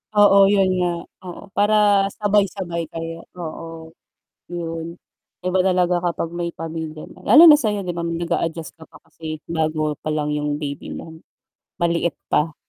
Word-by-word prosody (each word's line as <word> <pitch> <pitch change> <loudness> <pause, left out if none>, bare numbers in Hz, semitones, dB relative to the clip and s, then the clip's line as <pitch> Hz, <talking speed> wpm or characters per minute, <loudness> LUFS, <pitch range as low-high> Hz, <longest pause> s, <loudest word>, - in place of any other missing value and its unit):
Oo, 200 -1 +7
yun 195 -2 +3
nga. 175 -1 +1 0.4
Oo, 175 - -8
para 205 -1 +3
sabay-sabay 195 -5 0
kayo, 165 0 -7
oo, 165 -1 -8 0.6
yun. 170 -1 -5 0.5
Iba 185 0 +1
talaga 180 -1 +2
kapag 170 -1 -2
may 175 0 -3
pamilya 160 -1 -6
na - - -17
lalo 305 +10 +9
na 300 -2 +9
sa'yo, 210 -5 -1
'di 175 - -3
ba, 170 - -5
nag-a-adjust 170 -1 -2
ka 160 - -13
pa - - -17
kasi 155 -1 -8
bago 155 -2 -1
pa - - -5
lang 150 -1 -1
yung 150 0 -1
baby 145 -2 -5
mo, 160 0 -8 0.6
maliit 170 0 0
pa. 150 0 0
170 Hz, 150 wpm, -21 LUFS, 160-190 Hz, 0.6 s, lalo